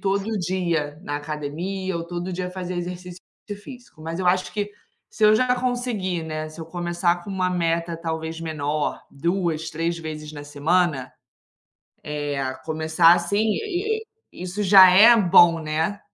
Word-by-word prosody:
todo 200 Hz, +2 st, -1 dB
dia 170 Hz, -5 st, -2 dB
na 145 Hz, -5 st, -3 dB
academia 160 Hz, +6 st, -4 dB
ou 165 Hz, -, -4 dB
todo 175 Hz, +1 st, -4 dB
dia 180 Hz, 0 st, -3 dB
fazer 180 Hz, -1 st, -5 dB
exercício 180 Hz, 0 st, -6 dB, 0.4 s
físico. 245 Hz, -, -13 dB
Mas 165 Hz, +3 st, -5 dB
eu 185 Hz, -, -1 dB
acho 185 Hz, +1 st, +1 dB
que 205 Hz, -1 st, -3 dB, 0.4 s
se 215 Hz, -, 0 dB
eu 215 Hz, 0 st, +7 dB
já 250 Hz, +2 st, +2 dB
conseguir, 240 Hz, -9 st, -2 dB
né, 155 Hz, -1 st, -5 dB
se 155 Hz, +1 st, -11 dB
eu -, -, -5 dB
começar 175 Hz, 0 st, -1 dB
com -, -, -7 dB
uma 185 Hz, -1 st, 0 dB
meta 170 Hz, -1 st, -1 dB
talvez 160 Hz, 0 st, -4 dB
menor, 150 Hz, -2 st, -2 dB
2, 170 Hz, +1 st, -1 dB
3 165 Hz, +1 st, -2 dB
vezes 155 Hz, -1 st, -7 dB
na 145 Hz, -1 st, -8 dB
semana, 145 Hz, -1 st, 0 dB, 1.0 s
eh, 145 Hz, -1 st, -3 dB
a 130 Hz, -1 st, -2 dB
começar 160 Hz, +4 st, +3 dB
assim, 175 Hz, +3 st, -1 dB
i 405 Hz, -, -1 dB
i 445 Hz, +1 st, -21 dB
i -, -, -5 dB
isso 185 Hz, +3 st, -4 dB
já 190 Hz, -1 st, +9 dB
é 220 Hz, +6 st, +8 dB
bom, 175 Hz, -5 st, +6 dB
né. 160 Hz, +6 st, -2 dB
175 Hz, 165 wpm, -23 LUFS, 160-190 Hz, 1.0 s, já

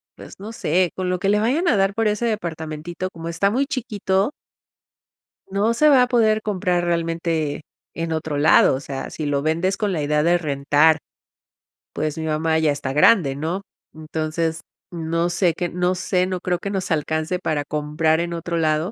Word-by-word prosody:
pues, -, -, -13 dB
no 210 Hz, +3 st, -8 dB
sé, 180 Hz, -3 st, +1 dB
con 185 Hz, -1 st, -2 dB
lo 180 Hz, 0 st, -1 dB
que 195 Hz, -, -1 dB
le 210 Hz, +1 st, +3 dB
vayan 280 Hz, +11 st, +1 dB
a 260 Hz, -, +4 dB
dar 195 Hz, 0 st, +2 dB
por 225 Hz, +1 st, +1 dB
ese 210 Hz, +2 st, -1 dB
departamentito 170 Hz, -4 st, -4 dB
como 165 Hz, -1 st, -8 dB
está 170 Hz, +4 st, +1 dB
muy 265 Hz, +5 st, +1 dB
chiquito 210 Hz, -4 st, -1 dB, 1.2 s
no 200 Hz, +4 st, +1 dB
se 300 Hz, +6 st, +4 dB
va 265 Hz, -3 st, +6 dB
a -, -, +1 dB
poder 220 Hz, -3 st, +3 dB
comprar 180 Hz, -4 st, 0 dB
realmente 165 Hz, -3 st, -1 dB, 0.3 s
en 165 Hz, -1 st, -3 dB
otro 155 Hz, -2 st, -3 dB
lado, 150 Hz, -2 st, +5 dB
o -, -, -3 dB
sea, 135 Hz, -1 st, -6 dB
si 155 Hz, -, -5 dB
lo 145 Hz, -1 st, 0 dB
vendes 165 Hz, +5 st, 0 dB
con 205 Hz, -1 st, -1 dB
la 165 Hz, -5 st, -1 dB
idea 150 Hz, +1 st, +1 dB
de 175 Hz, +2 st, +4 dB
rentar, 150 Hz, +1 st, +2 dB, 0.9 s
pues, 155 Hz, +1 st, -2 dB
mi 160 Hz, -, -3 dB
mamá 160 Hz, +1 st, +1 dB
ya 155 Hz, -2 st, +2 dB
está 140 Hz, -2 st, -3 dB
grande, 150 Hz, -2 st, +4 dB
¿no?, 160 Hz, +7 st, -3 dB, 0.3 s
entonces 160 Hz, +1 st, -3 dB, 0.3 s
no 165 Hz, 0 st, -1 dB
sé 175 Hz, 0 st, +1 dB
qué 175 Hz, -, -2 dB
no 180 Hz, +1 st, 0 dB
sé, 180 Hz, 0 st, 0 dB
no 185 Hz, -1 st, -3 dB
creo 180 Hz, -1 st, -1 dB
que 200 Hz, -, -4 dB
nos 190 Hz, -2 st, -3 dB
alcance 155 Hz, +3 st, -1 dB
para 155 Hz, -5 st, -2 dB
comprar 150 Hz, +2 st, 0 dB
en 170 Hz, 0 st, -2 dB
otro 170 Hz, 0 st, -3 dB
lado, 155 Hz, +3 st, +1 dB
170 Hz, 190 wpm, -22 LUFS, 155-195 Hz, 1.2 s, va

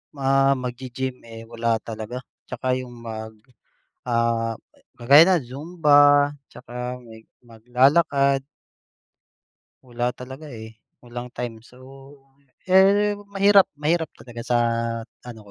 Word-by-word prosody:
ma 135 Hz, 0 st, +2 dB
maggi-gym, 125 Hz, +1 st, -5 dB
eh, 115 Hz, -1 st, -11 dB
wala 115 Hz, 0 st, -1 dB
talaga. 115 Hz, +3 st, -7 dB, 0.2 s
Tsaka 130 Hz, 0 st, -2 dB
yung 125 Hz, -1 st, -9 dB
mag, 110 Hz, -1 st, -8 dB, 0.7 s
ah, 115 Hz, -1 st, 0 dB, 0.4 s
kagaya 140 Hz, +7 st, +7 dB
ng 180 Hz, -6 st, +3 dB
Zumba 145 Hz, -1 st, +4 dB, 0.2 s
tsaka 125 Hz, 0 st, -7 dB
may 110 Hz, -1 st, -14 dB, 0.2 s
maglalakad. 135 Hz, +4 st, +2 dB, 1.4 s
Wala 120 Hz, 0 st, -3 dB
talaga, 130 Hz, +4 st, -10 dB
eh, 110 Hz, -4 st, -11 dB, 0.2 s
walang 120 Hz, 0 st, -7 dB
time. 120 Hz, -2 st, -5 dB
So, 125 Hz, +2 st, -19 dB, 0.9 s
eh, 200 Hz, +2 st, +4 dB, 0.2 s
mahirap 200 Hz, 0 st, +5 dB
mahirap 160 Hz, +3 st, 0 dB
talaga 120 Hz, -1 st, -10 dB
sa 120 Hz, -, +1 dB, 0.7 s
ano 120 Hz, -3 st, -9 dB
125 Hz, 105 wpm, -23 LUFS, 115-145 Hz, 1.4 s, kagaya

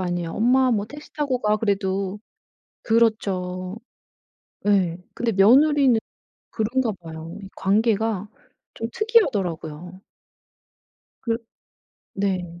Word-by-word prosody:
아니에요. 175 Hz, -2 st, -2 dB
"엄마 255 Hz, +3 st, +3 dB
뭐 210 Hz, -3 st, 0 dB
택시 295 Hz, +6 st, -12 dB
타고 280 Hz, -4 st, -1 dB
가." 210 Hz, 0 st, +2 dB
그래도. 195 Hz, -2 st, -1 dB, 0.6 s
그렇죠. 190 Hz, -5 st, 0 dB, 0.9 s
예. 185 Hz, -5 st, +3 dB, 0.2 s
근데 235 Hz, -1 st, -1 dB
며느리는 260 Hz, +5 st, +5 dB, 0.5 s
그런가 230 Hz, +1 st, 0 dB
봐요. 160 Hz, 0 st, -8 dB
이 195 Hz, -, -8 dB
관계가 210 Hz, 0 st, +1 dB, 0.5 s
좀 225 Hz, -, -4 dB
특이하더라고요. 185 Hz, -, 0 dB, 1.2 s
그 230 Hz, -2 st, 0 dB, 0.8 s
네. 180 Hz, -3 st, -2 dB
205 Hz, 210 characters per minute, -23 LUFS, 185-235 Hz, 1.2 s, 며느리는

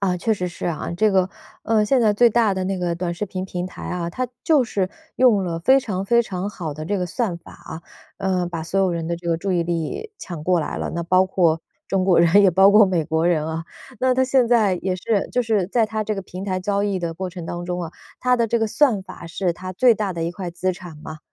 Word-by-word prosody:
啊， 185 Hz, -2 st, +1 dB
确 220 Hz, +5 st, 0 dB
实 180 Hz, -3 st, -2 dB
是 175 Hz, -, -6 dB
啊， 170 Hz, -1 st, -3 dB
这 215 Hz, +2 st, +3 dB
个， 190 Hz, -1 st, +2 dB, 0.3 s
呃， 220 Hz, -2 st, +2 dB
现 260 Hz, +3 st, +2 dB
在 215 Hz, -3 st, +4 dB
最 235 Hz, +3 st, +5 dB
大 225 Hz, -3 st, +2 dB
的 190 Hz, 0 st, -2 dB
那 190 Hz, 0 st, -2 dB
个 175 Hz, -1 st, -1 dB
短 175 Hz, 0 st, -3 dB
视 205 Hz, +5 st, -4 dB
频 185 Hz, -1 st, -4 dB
平 180 Hz, -1 st, -4 dB
台 185 Hz, -, -11 dB
啊， 175 Hz, -1 st, -3 dB
它 255 Hz, +7 st, -2 dB, 0.2 s
就 300 Hz, -5 st, +4 dB
是 195 Hz, -5 st, -1 dB, 0.3 s
用 225 Hz, -7 st, +4 dB
了 165 Hz, -2 st, -3 dB
非 265 Hz, +11 st, +5 dB
常 195 Hz, -6 st, -3 dB
非 235 Hz, +4 st, +3 dB
常 195 Hz, -2 st, -4 dB
好 170 Hz, -7 st, -5 dB
的 155 Hz, +1 st, -6 dB
这 205 Hz, +4 st, -1 dB
个 180 Hz, -, -1 dB
算 195 Hz, -3 st, -2 dB
法 -, -, -15 dB
啊， 160 Hz, -, -10 dB, 0.4 s
呃， 185 Hz, -2 st, 0 dB
把 165 Hz, -2 st, -5 dB
所 190 Hz, +4 st, -1 dB
有 190 Hz, -1 st, +2 dB
人 165 Hz, -1 st, -3 dB
的 170 Hz, -, -2 dB
这 170 Hz, 0 st, -7 dB
个 165 Hz, -, +2 dB
注 190 Hz, +3 st, -2 dB
意 175 Hz, -2 st, +2 dB
力 170 Hz, -, -3 dB
抢 170 Hz, -4 st, -7 dB
过 180 Hz, -2 st, +2 dB
来 150 Hz, -, -4 dB
了， -, -, -3 dB
那 170 Hz, -, -2 dB
包 185 Hz, +2 st, +3 dB
括 170 Hz, -4 st, +2 dB, 0.3 s
中 195 Hz, -1 st, 0 dB
国 185 Hz, -2 st, +4 dB
人， 170 Hz, +4 st, +5 dB
也 195 Hz, -, +6 dB
包 190 Hz, +3 st, +6 dB
括 210 Hz, 0 st, +7 dB
美 175 Hz, -4 st, 0 dB
国 160 Hz, +1 st, 0 dB
人 155 Hz, -3 st, +1 dB
啊。 160 Hz, +1 st, -4 dB, 0.4 s
那 255 Hz, 0 st, +3 dB
它 260 Hz, +1 st, +3 dB
现 260 Hz, -2 st, +3 dB
在 215 Hz, -6 st, +4 dB
也 185 Hz, -1 st, -1 dB
是， 200 Hz, +2 st, -1 dB
就 250 Hz, -, +1 dB
是 215 Hz, -5 st, +1 dB
在 225 Hz, +4 st, +2 dB
它 215 Hz, 0 st, -2 dB
这 215 Hz, -, -1 dB
个 195 Hz, -, -5 dB
平 185 Hz, +1 st, -8 dB
台 185 Hz, -2 st, -1 dB
交 200 Hz, +1 st, 0 dB
易 200 Hz, -2 st, 0 dB
的 170 Hz, -2 st, -3 dB
过 185 Hz, +3 st, -4 dB
程 175 Hz, -2 st, -8 dB
当 175 Hz, 0 st, -5 dB
中 180 Hz, 0 st, -3 dB
啊， 165 Hz, -, -6 dB, 0.3 s
它 250 Hz, 0 st, +3 dB
的 230 Hz, -1 st, +1 dB
这 235 Hz, +1 st, +1 dB
个 225 Hz, -, +1 dB
算 220 Hz, -3 st, +2 dB
法 175 Hz, -, -10 dB
是 175 Hz, +1 st, -1 dB
它 185 Hz, +2 st, -7 dB
最 240 Hz, +4 st, +4 dB
大 205 Hz, -3 st, -2 dB
的 165 Hz, -1 st, -4 dB
一 170 Hz, -, -1 dB
块 180 Hz, -2 st, -5 dB
资 185 Hz, +2 st, -1 dB
产 175 Hz, -3 st, -10 dB
嘛。 155 Hz, 0 st, -9 dB
185 Hz, 290 characters per minute, -22 LUFS, 175-210 Hz, 0.4 s, 括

